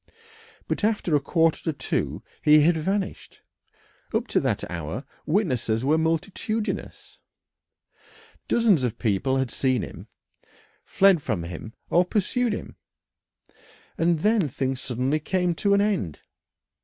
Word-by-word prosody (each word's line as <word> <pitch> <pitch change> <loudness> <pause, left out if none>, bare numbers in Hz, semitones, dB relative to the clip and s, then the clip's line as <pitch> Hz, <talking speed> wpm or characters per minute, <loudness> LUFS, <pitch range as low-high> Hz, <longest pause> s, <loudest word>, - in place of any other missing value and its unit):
But - - -2
after 210 -7 +1
a - - +4
quarter 165 +3 +1
to 160 - 0
two - - -2 0.2
he 150 0 +6
had 165 +3 +4
vanished. 190 +5 -3 0.7
Up - - +1
to - - +3
that - - -1
hour 85 - -5 0.2
witnesses 130 - 0
were 155 +3 +3
multitudinous. 195 +7 -3 1.3
Dozens 215 - +3
of 120 -3 -1
people 120 +4 0
had 130 -3 -1
seen 130 -1 +1
him, - - -9 0.8
fled 195 -4 +4
from 105 -10 -2
him 90 +6 -7 0.2
or 175 - +5
pursued 225 +6 0
him, 210 - -6 1.2
and 165 -1 +1
then 210 -6 +2
things 130 +1 -2
suddenly 130 +4 -1
came 180 +2 0
to 200 +4 +2
an 200 - +3
end. 195 - -1
160 Hz, 130 wpm, -25 LUFS, 130-195 Hz, 1.3 s, he